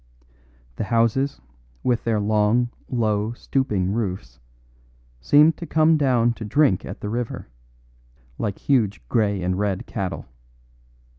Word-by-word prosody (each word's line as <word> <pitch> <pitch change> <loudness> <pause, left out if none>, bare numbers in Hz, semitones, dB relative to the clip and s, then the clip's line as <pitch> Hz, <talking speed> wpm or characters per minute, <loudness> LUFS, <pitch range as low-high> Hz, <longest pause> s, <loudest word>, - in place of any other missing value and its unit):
The - - -2
houses, 115 +5 +1 0.4
with 120 -2 0
their 115 -2 +1
long, 110 +3 +2 0.2
low, 110 -2 0
stooping 105 -8 -1
roofs, 90 - -4 0.8
seemed 150 - +5
to 170 - -7
come 160 0 +4
down 125 -5 +2
to 115 - -8
drink 110 -3 +2
at - - -8
the 105 - -4
river, 120 - -4 0.9
like 100 -3 -2
huge 105 - 0
grey 100 -4 +1
and 90 +1 -1
red 100 -2 -1
cattle. 95 -2 -4
110 Hz, 125 wpm, -23 LUFS, 100-125 Hz, 0.9 s, seemed